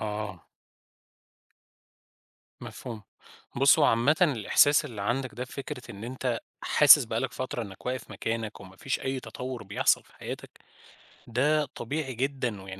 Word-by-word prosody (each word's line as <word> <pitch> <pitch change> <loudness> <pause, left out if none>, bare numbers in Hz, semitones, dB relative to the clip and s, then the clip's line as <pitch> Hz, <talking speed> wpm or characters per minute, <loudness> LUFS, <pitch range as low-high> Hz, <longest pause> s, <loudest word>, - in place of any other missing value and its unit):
آه. 105 -3 -5 2.1
مفهوم، 115 -4 -8 0.5
بُصّ 135 0 +6
هو - - +5
عامةً 120 +7 +4
الإحساس 145 - +4
اللي 115 -8 -6
عندك 125 +5 -1
ده 125 - -4
فكرة 135 0 -7
إن 100 +2 -8
أنت 125 -1 -2 0.2
حاسس - - +7
بقى - - -2
لك - - -2
فترة 130 -2 -4
إنك 100 +1 -10
واقف 125 -2 -3
مكانك 115 -2 -4
وما 95 -1 -13
فيش 135 - -2
أي 130 -1 -2
تطور 125 -3 -6
بيحصل 100 0 +2
في - - -24
حياتك - - -7 0.8
ده 150 +6 +2
طبيعي 135 +2 -4
جدًا، 125 -6 -2
125 Hz, 135 wpm, -28 LUFS, 110-135 Hz, 2.1 s, حاسس